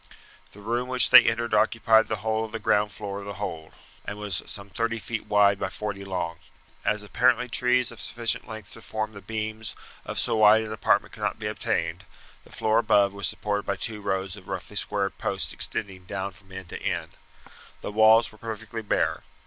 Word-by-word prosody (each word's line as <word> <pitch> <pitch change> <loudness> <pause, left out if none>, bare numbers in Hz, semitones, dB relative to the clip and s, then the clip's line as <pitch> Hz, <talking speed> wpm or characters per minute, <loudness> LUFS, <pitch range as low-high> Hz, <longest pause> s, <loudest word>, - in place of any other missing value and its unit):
The 105 - -13
room 120 +4 -1
which 130 0 +3
they 130 - +10
entered 115 0 0
occupied 110 +1 +4
the - - -1
whole 110 0 +1
of 110 - -10
the 115 - -3
ground 105 -1 +2
floor 100 -1 -5
of 100 - -8
the 100 0 -6
hold, 80 -6 -5 0.3
and 105 - -6
was 105 -3 -2
some 100 -1 -7
thirty 115 +4 -1
feet 110 +1 -5
wide 100 -1 +4
by - - -1
forty 100 -2 -5
long. 90 -3 -3 0.5
As 105 0 0
apparently 125 +3 +2
trees 125 0 +2
of 115 -4 -7
sufficient 115 +1 -2
length 110 -2 -9
to 115 - -12
form 110 -1 -3
the 100 - -10
beams 110 0 -4 0.3
of - - -6
so - - +1
wide 110 +1 +6
an 110 0 -5
apartment 110 - +1
could - - -11
not - - -1
be - - -7
obtained, - - -2 0.4
the - - -18
floor 110 +1 +2
above 105 -3 +3
was 100 0 -2
supported 105 -1 -2
by 100 - 0
two 105 +2 -4
rows 95 -1 -2
of 95 -3 -14
roughly - - -6
squared 100 -1 -1
posts 95 -7 -1
extending 95 -3 -1
down 100 +1 -4
from 95 +1 -20
end 95 -2 -8
to - - -6
end. - - -2 0.7
The - - -5
walls 110 +2 +5
were 110 - -18
perfectly 115 0 -6
bare. 105 - 0
105 Hz, 205 wpm, -26 LUFS, 100-110 Hz, 0.7 s, they